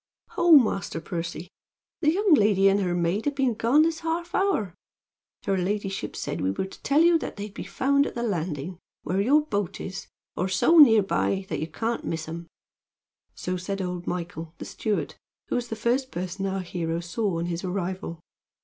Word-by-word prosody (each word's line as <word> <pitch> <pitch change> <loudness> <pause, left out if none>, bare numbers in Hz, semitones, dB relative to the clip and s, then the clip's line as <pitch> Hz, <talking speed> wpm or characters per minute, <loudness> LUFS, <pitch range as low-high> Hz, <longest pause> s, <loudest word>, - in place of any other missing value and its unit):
"Ho, 345 -1 +4
Master 215 - +4
Percy! 170 0 -5 0.5
the 305 -2 +3
young 390 +1 +3
lady 205 -6 +5
and 195 +1 +4
her 180 -3 0
maid 175 +5 0
have 290 -1 0
been 265 -3 +2
gone 235 +7 +4
this 325 0 0
half 335 +2 -3
hour. 385 - +1 0.7
Her 195 - +1
ladyship 195 +1 -2
said - - -4
we 95 - +1
were 100 - -2
to 190 - -12
tell 285 +3 +3
you 335 0 +5
that - - -6
they'd 205 0 -7
be - - -7
found 280 +8 +2
at - - -7
the 235 - -2
landing, 170 -4 -3 0.2
where 190 +3 0
your 295 +8 +4
boat 205 - -2
is, 190 +1 -6 0.3
or 185 - 0
so 325 - +4
near 225 -8 +8
by 195 0 0
that - - -2
you 155 - -3
can't 225 +8 -3
miss 160 -1 -3
'em." 165 +1 -7 0.9
So 180 0 -3
said 195 +2 -4
old 180 -1 -4
Michael, 170 -2 -5
the - - -7
steward, 215 -2 -2 0.4
who - - 0
was 245 -1 -1
the 225 - -4
first 245 +4 0
person 185 +1 -4
our 195 0 -2
hero 170 -2 -3
saw 175 +2 -2
on 165 - -2
his 175 +1 -3
arrival. 185 -2 -4
195 Hz, 195 wpm, -26 LUFS, 175-245 Hz, 0.9 s, near